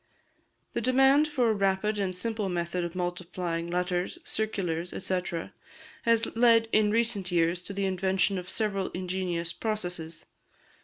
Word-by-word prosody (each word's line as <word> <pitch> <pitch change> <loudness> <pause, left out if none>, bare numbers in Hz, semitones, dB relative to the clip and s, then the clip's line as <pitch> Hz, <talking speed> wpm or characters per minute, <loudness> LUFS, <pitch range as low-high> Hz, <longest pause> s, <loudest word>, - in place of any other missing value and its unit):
The - - -1
demand 270 +5 +5
for 255 -6 +2
a - - +2
rapid 200 +1 +1
and 190 -2 -1
simple 215 +1 -2
method 175 0 -2
of 170 +1 -5
multiplying 175 -1 -3
letters, 180 - -1
circulars, 180 - -2
&c., 185 -1 +1 0.8
has 230 -1 +2
led 230 -1 +5
in 215 -1 +4
recent 215 -4 +1
years 170 0 +2
to 190 - -7
the 200 0 -1
invention 190 +1 +1
of 180 0 -9
several 200 -4 -1
ingenious 180 -2 -2
processes. 180 -7 -4
190 Hz, 140 wpm, -28 LUFS, 175-220 Hz, 0.8 s, demand